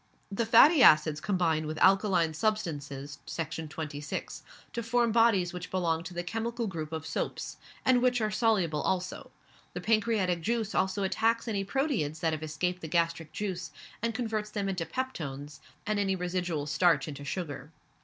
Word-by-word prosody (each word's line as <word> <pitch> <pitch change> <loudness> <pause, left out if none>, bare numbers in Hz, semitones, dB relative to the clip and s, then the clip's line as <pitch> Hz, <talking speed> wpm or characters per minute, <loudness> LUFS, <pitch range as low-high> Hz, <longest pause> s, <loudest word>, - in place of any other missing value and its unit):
The 220 +3 -1
fatty 275 +7 +7
acids 155 -6 +6
combine 165 -6 +1
with 155 0 -4
alkaline 190 -3 +4
substances 150 -8 -2
(Section 160 -1 -4
26) 150 -1 -5 0.3
to 235 - -2
form 235 0 +1
bodies 215 -6 +3
which 180 0 -6
belong 170 -3 0
to 180 - -8
the 175 - -2
chemical 230 +5 -3
group 160 -6 -5
of 160 -1 -4
Soaps, - - -4 0.3
and 255 -1 +4
which 250 -1 +3
are 215 -1 0
soluble 210 -9 +1
also. 185 -1 -2 0.5
The - - -3
pancreatic 215 -6 +1
juice 225 +3 -1
also 190 +1 +1
attacks 230 +5 +1
any 200 -3 -1
proteids 200 - -1
that 165 -1 +1
have 155 - -3
escaped 170 +4 -2
the 160 - -5
gastric 165 -1 0
juice, 185 -4 -4 0.3
and 230 0 -1
converts 220 -3 -2
them 205 -2 -2
into 185 -4 -2
peptones, 150 - -5 0.3
and 215 -1 0
any 195 -1 +1
residual 175 -4 -2
starch 165 +4 +2
into 145 -1 -7
sugar. 145 -2 -5
180 Hz, 165 wpm, -29 LUFS, 160-220 Hz, 0.5 s, fatty